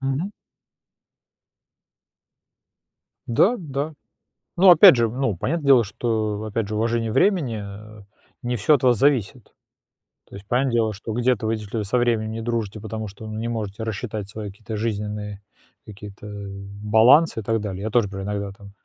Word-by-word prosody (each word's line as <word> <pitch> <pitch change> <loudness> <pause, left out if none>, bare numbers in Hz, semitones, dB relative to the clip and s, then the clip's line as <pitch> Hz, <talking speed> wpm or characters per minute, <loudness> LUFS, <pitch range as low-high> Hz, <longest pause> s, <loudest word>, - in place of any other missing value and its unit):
Мгм. 135 +8 -2 3.0
Да, 190 - +3
да. 150 -2 -4 0.7
Ну, 190 +2 +7
опять 170 -5 +9
же, 115 -2 +2
ну, 125 -3 -1
понятное 150 - -2
дело, 130 -4 +7
что, 110 0 -2
опять 110 0 -3
же, 105 - -4
уважение 115 +1 0
времени, 140 - +1
э, 105 +1 -10 0.4
не 125 0 -1
всё 120 +7 +4
от 135 - -4
вас 125 -2 +4
зависит. 130 -3 0 0.8
То - - -12
есть 100 0 -11
понятное 125 +2 +1
дело, 110 -2 +1
что 105 +2 -6
где-то 120 -1 +1
вы, 110 +1 +1
действительно, 110 0 -4
со 105 +5 0
временем 115 -3 +1
не 115 +1 -5
дружите, 110 -2 -3
потому 110 +1 -5
что, 105 +2 -11
ну, 110 0 -6
не 115 +1 -3
можете 110 -2 -4
рассчитать 110 -2 -5
свои 105 0 -6
какие-то 110 +2 -7
жизненные 105 -2 -4 0.4
какие-то, 105 0 -11
э, 100 -1 -7 0.4
балансы 115 +8 +5
и - - -12
так 115 +2 0
далее. 100 -2 -5
Я 110 - -2
тоже 115 -1 +2
например 95 0 -6
иногда 100 -1 -3
там 100 0 -14
110 Hz, 165 wpm, -23 LUFS, 105-120 Hz, 3.0 s, опять